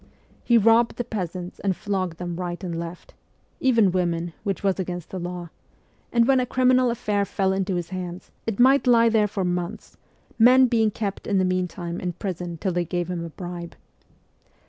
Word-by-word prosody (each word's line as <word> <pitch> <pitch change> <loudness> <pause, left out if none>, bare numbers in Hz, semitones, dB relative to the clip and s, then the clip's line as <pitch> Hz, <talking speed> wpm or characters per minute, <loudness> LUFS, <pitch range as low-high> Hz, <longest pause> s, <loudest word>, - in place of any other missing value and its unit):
He 235 - +4
robbed 230 +2 +4
the 245 - -2
peasants 185 -5 -5
and 195 -2 0
flogged 190 -5 -2
them 175 -1 -4
right 175 +1 -4
and 170 -2 -3
left 170 +1 -8 0.5
even 230 -7 +4
women, 170 -2 -1
which 200 -2 -2
was 195 -1 +1
against 180 -2 -4
the 190 - -4
law; 175 -1 -6 0.6
and 235 0 +3
when 270 -1 +4
a 250 - +1
criminal 255 0 +3
affair 210 -3 0
fell 195 -1 0
into 190 -1 -1
his 175 -1 -3
hands, 180 -1 -6 0.2
it 225 -1 -2
might 265 +2 +5
lie 230 -1 +6
there 220 -2 +3
for 195 -2 -2
months, 175 -1 -4 0.4
men 255 +3 +7
being 230 -3 +2
kept 200 -1 -4
in 200 - +1
the 185 - +3
meantime 180 -1 -2
in 180 -1 -3
prison 175 -2 -5
till 185 +4 -1
they 175 0 0
gave 175 +1 -3
him 170 -2 -3
a 170 - -6
bribe. 175 0 -7
185 Hz, 190 wpm, -24 LUFS, 175-225 Hz, 0.6 s, men